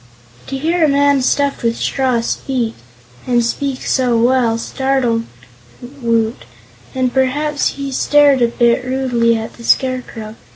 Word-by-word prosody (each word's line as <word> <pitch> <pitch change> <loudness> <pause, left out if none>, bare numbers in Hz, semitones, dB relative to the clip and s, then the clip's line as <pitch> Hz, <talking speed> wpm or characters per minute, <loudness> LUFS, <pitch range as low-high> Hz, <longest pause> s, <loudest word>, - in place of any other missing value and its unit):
To 270 - -4
hear 330 +4 0
a - - +5
man 280 -1 +3
stuffed 280 +2 0
with 230 0 0
straw 255 -3 0
speak, 235 -1 -2 0.5
and 240 -2 +2
speak 270 +2 -3
so 250 -3 +1
well, 240 0 +2
quite - - -4
startled 260 -4 -1 0.8
Woot, 230 - 0 0.5
and 255 -1 0
perhaps 290 +3 0
he 275 -1 -5
stared 285 0 +3
a 235 - +4
bit 235 +1 +1
rudely 250 -3 +1
at 220 0 -6
the 235 - -12
Scarecrow. 240 -4 -1
255 Hz, 140 wpm, -16 LUFS, 235-275 Hz, 0.8 s, a